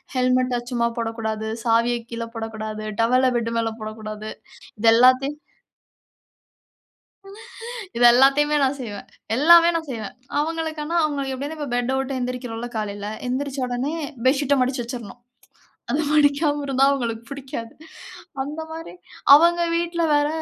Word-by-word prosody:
ஹெல்மெட்ட 255 -1 +1
சும்மா 235 -1 +1
போடக்கூடாது, 220 -1 -3 0.2
சாவியக் 235 +1 +1
கீழ 230 0 -4
போடக்கூடாது, 220 -1 -5 0.2
டவல்ல 255 +3 +3
பெட் 230 0 -2
மேல 225 0 -1
போடக்கூடாது. 215 0 -6 0.5
இது 225 +1 +5
எல்லாத்தையும் 255 +4 +4 2.6
இது 240 - +3
எல்லாத்தையுமே 280 +4 +4
நான் 270 +1 0
செய்வேன். 210 -5 -7 0.3
எல்லாமே 335 +5 +7
நான் 320 -2 -5
செய்வேன். 220 -4 -6 0.3
அவங்களுக்கு 320 0 -3
ஆனா 335 +3 -2
அவங்களுக்கு 280 -3 -2
எப்டியும் 290 +4 -5
இப்ப 295 -3 -5
பெட்ட 245 +2 0
உட்டு 270 0 -3
எழுந்திரிக்கிறோம்ல 245 -2 -4
காலைல, 205 -1 -4 0.2
எந்திரிச்சவுடனே 260 +1 -2 0.3
பெட்ஷீட்ட 280 +1 +3
மடிச்சு 255 0 -1
வச்சுறணும். 240 -2 -8 0.7
அத 290 - +1
மடிக்காம 295 0 +3
இருந்தா 270 0 +2
அவங்களுக்கு 235 -5 -2
புடிக்காது. 260 -4 -7 0.7
அந்த 295 +4 -6
மாரி 325 - -8 0.4
அவங்க 340 +3 +5
வீட்ல 340 0 -1
வேற, 290 0 +3
255 Hz, 125 wpm, -22 LUFS, 230-290 Hz, 2.6 s, எல்லாமே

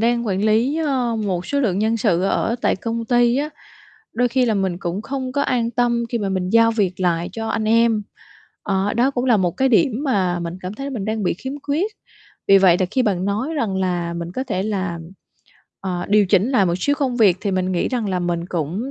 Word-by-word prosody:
đang 235 0 +1
quản 195 0 -1
lý, 230 +7 +2
ơ, 260 -7 0
một 190 -5 -2
số 285 0 0
lượng 200 -7 0
nhân 220 +2 +1
sự 195 -6 +1
ở 225 +4 0
tại - - +1
công 230 +3 -3
ty 240 0 +3
á, 295 +2 -1 0.6
đôi 245 +2 +1
khi 255 +1 +2
là 220 - +1
mình 190 -3 -1
cũng 180 +2 -4
không 260 0 -4
có 285 +1 0
an 235 -3 0
tâm 235 0 +1
khi 235 - -1
mà 200 -2 -2
mình 185 -1 -2
giao 230 +1 +5
việc 190 -5 -1
lại 175 -1 0
cho 225 0 -4
anh 220 - -1
em, 225 0 +3 0.6
ờ, 195 0 0
đó 250 +4 +2
cũng 250 -2 -2
là 240 -4 +4
một 180 -3 +1
cái 265 0 +2
điểm 255 +2 +2
mà 185 -9 0
mình 170 +1 -5
cảm 185 +2 -5
thấy 275 +5 -5
mình 230 -8 -4
đang 220 -1 -2
bị - - +1
khiếm 260 +10 -6
khuyết. 320 +9 -1 0.6
Vì 195 - +7
vậy 185 -3 +5
là 185 - +2
khi 260 - +2
bạn 190 -4 0
nói 215 +10 -2
rằng 225 -9 -1
là 175 -2 -1
mình 170 0 -5
có 260 +7 -3
thể 190 -7 -2
là, 190 -5 -2 0.8
ờ, 180 -2 -3
điều 205 -1 +4
chỉnh 195 +5 +2
lại 210 -8 +3
một 175 - +1
xíu 285 +9 +1
công 265 -4 -1
việc, 205 -7 +4
thì 205 - -1
mình 185 0 -1
nghĩ 175 - 0
rằng 240 -5 -2
là 185 -1 -1
mình 175 0 -2
cũng 180 - -3
215 Hz, 240 wpm, -21 LUFS, 185-245 Hz, 0.8 s, Vì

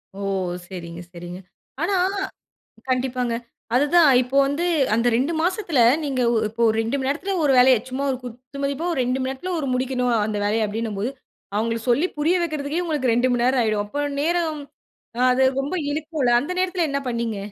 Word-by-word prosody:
ஓ - - -9 0.5
சரிங்க 170 -2 -8
சரிங்க. 175 +1 -8 0.4
ஆனா 375 +4 +1 1.0
கண்டிப்பாங்க. 250 -2 0 0.4
அதுதான் 295 +4 +5
இப்போ 255 +2 -4
வந்து 285 +5 -1 0.3
அந்த 230 +2 +1
2 270 +7 0
மாசத்தில 360 - 0 0.3
நீங்க 270 -3 -1
ஓ - - +1
இப்போ 225 +2 -10
ஒரு 220 - +1
2 230 +5 -1
மணி 265 - -2
நேரத்ல 330 +8 -2
ஒரு 280 - +4
வேலைய, 255 0 +7
சும்மா 265 +2 -2
ஒரு 255 - -2
குத்துமதிப்பா 275 +6 -4
ஒரு 300 - -2
2 250 +2 0
மணி 260 0 -1
நேரத்ல 315 +8 -5
ஒரு 280 - -3
முடிக்கணும் 250 -1 0
அந்த 215 -1 -3
வேலையை 220 +2 +1
அப்டின்னம்போது, 215 +1 -3 0.5
அவுங்களுக்கு 230 +2 -1
சொல்லி 285 +9 +3
புரிய 325 +5 +2
வக்கிறதுக்கே 305 0 -2
உங்களுக்கு 270 -7 +1
2 245 +2 +2
மணி 240 -1 +1
நேரம் 255 0 +3
ஆயிடும். 215 -2 0
அப்ப 290 +7 -2 0.2
நேரம் 330 -1 0 0.6
அ - - -1
அது 260 +1 +3 0.2
ரொம்ப 285 +7 -3 0.2
இழுக்கும்ல, 305 -3 -1
அந்த 285 - -6
நேரத்ல 360 -3 0
என்ன 280 - 0
பண்ணீங்க? 235 -3 -2
260 Hz, 175 wpm, -23 LUFS, 235-300 Hz, 1.0 s, வேலைய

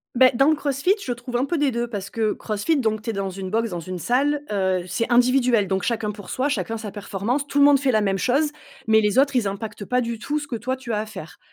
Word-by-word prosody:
Beh 255 +1 +6
dans 270 +5 +4
le 315 - +4
Crossfit 285 +7 +1
je 245 - -1
trouve 240 0 -4
un 260 - +1
peu 335 +4 -1
des 285 -3 +2
2 235 +1 -2
parce 200 -4 -5
que 220 -2 0
Crossfit 215 +9 -1
donc 220 -6 0
tu 225 +1 -3
es - - -6
dans 195 -1 -2
une 190 0 -6
box, 225 +3 0
dans 175 -3 -4
une 185 +2 -6
salle, 285 - +1
heu 190 -3 0
c'est 205 +7 -2
individuel 245 -4 +3
donc 190 0 0
chacun 225 -3 -1
pour 205 -2 -11
soi, 265 +3 0
chacun 225 -5 -2
sa 215 -2 -6
performance 210 +7 -3
tout 285 - 0
le - - +7
monde 285 -1 +6
fait 265 -3 +1
la 215 - +3
même 195 -2 +1
chose. 275 +9 +1 0.4
Mais 220 0 +5
les 210 +2 +1
autres 275 -1 +3
ils 220 - +1
impactent 205 +1 -5
pas 250 +5 +1
du 235 -2 -4
tout, 290 +7 -2
ce 290 - -5
que 235 - -2
toi 255 +4 -2
tu 260 -2 -7
as 210 - 0
à 215 - -3
faire. 190 -7 -10
230 Hz, 280 wpm, -23 LUFS, 205-265 Hz, 0.4 s, le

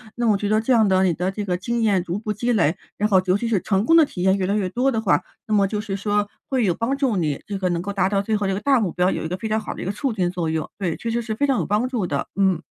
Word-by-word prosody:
那 240 -1 0
我 210 -2 +4
觉 205 - -2
得 215 +1 +2
这 255 - -1
样 220 -3 +4
的 190 0 +3
你 180 -2 +2
的 180 +4 -2
这 205 +1 -4
个 180 -2 -1
经 235 +5 -2
验 200 -5 +2
逐 175 +3 -3
步 215 -1 -3
积 235 +4 -1
累， 175 -7 +2 0.2
然 210 +1 +1
后 190 -2 +5
尤 185 +1 +3
其 235 - -3
是 215 -5 +2
成 195 -1 +1
功 330 - +5
的 320 - +7
体 180 - -7
验 190 +1 +3
越 185 - -1
来 200 - 0
越 190 -3 0
多 255 +6 +1
的 225 - -1
话， 195 -4 +2 0.3
那 215 - +1
么 200 - +4
就 210 +1 -3
是 200 -3 -4
说 205 +1 0 0.2
会 260 -3 +1
有 175 -4 +1
帮 235 +7 -1
助 270 -6 0
你 155 -6 -1
这 200 -1 -3
个 185 -1 -1
能 170 -1 -1
够 200 +2 -4
达 190 -2 +1
到 200 -1 +1
最 215 +2 -1
后 205 - -2
这 195 - 0
个 190 - -2
大 270 +3 +3
目 190 -6 -1
标， 180 +1 +1
有 - - -2
一 - - -2
个 180 +3 -3
非 220 +2 -5
常 220 +1 +1
好 - - -6
的 - - -8
一 - - -5
个 195 - -1
促 255 +4 -2
进 180 -4 0
作 175 -3 -2
用。 160 -1 -2
对， 180 -5 -2
确 230 - -4
实 235 +1 0
是 220 -1 -3
非 285 +6 0
常 270 - +2
有 - - -1
帮 210 +5 +1
助 235 -8 -1
的。 140 -4 -2
嗯。 190 -4 +2
205 Hz, 375 characters per minute, -22 LUFS, 185-225 Hz, 0.3 s, 的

